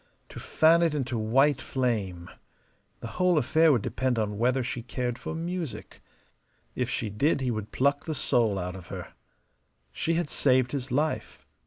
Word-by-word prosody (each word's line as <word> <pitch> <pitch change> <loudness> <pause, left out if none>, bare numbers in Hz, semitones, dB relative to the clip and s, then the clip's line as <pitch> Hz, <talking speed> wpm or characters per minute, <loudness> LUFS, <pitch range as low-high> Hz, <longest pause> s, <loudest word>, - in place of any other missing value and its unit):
To - - -9
fan 165 +2 +4
it 165 -3 +2
into 130 -3 -2
white 130 +5 +2
flame. 100 -9 -2 0.7
The - - -5
whole 180 -2 +4
affair 160 +2 +4
would 120 -7 +2
depend 130 -1 -1
upon 105 -2 -2
whether 125 +2 +2
she 120 0 -4
cared 125 0 -3
for - - -5
music. 165 - -5 0.7
If - - -2
she 110 -3 -2
did 140 +9 +1
he 130 -2 -1
would 110 -2 -5
pluck 140 +2 +1
the 155 - -3
soul 115 -6 +1
out 90 0 -4
of 90 -3 -10
her. - - -8 0.8
She 165 - -1
had 170 -2 0
saved 130 -3 +2
his 135 -2 -4
life. 150 +5 -2
130 Hz, 170 wpm, -27 LUFS, 110-150 Hz, 0.8 s, fan